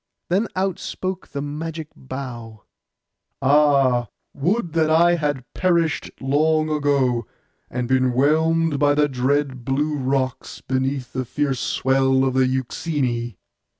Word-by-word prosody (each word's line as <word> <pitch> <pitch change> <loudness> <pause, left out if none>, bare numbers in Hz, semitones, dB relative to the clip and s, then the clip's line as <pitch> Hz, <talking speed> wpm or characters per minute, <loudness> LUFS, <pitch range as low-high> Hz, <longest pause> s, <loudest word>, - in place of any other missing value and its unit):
Then 195 +6 +1
out 190 -1 -1
spoke 185 -1 -5
the 140 -1 -5
magic 155 +2 -5
bough, 120 -5 -8 0.8
'Ah, 135 -4 +3 0.3
would 175 +3 -1
that 160 -1 +2
I 170 +2 +5
had 145 -6 -1
perished 170 -4 +1
long 155 +3 +1
ago, 140 -5 +1 0.4
and 125 -1 -3
been 130 -1 +2
whelmed 160 +3 +2
by 145 0 +3
the 150 0 +3
dread 135 0 -1
blue 145 +4 0
rocks, 130 -1 -2
beneath 130 -1 -2
the 130 - -1
fierce 135 +1 -1
swell 130 0 +2
of 130 - 0
the 130 0 +3
Euxine! 130 - -2
140 Hz, 125 wpm, -22 LUFS, 130-155 Hz, 0.8 s, I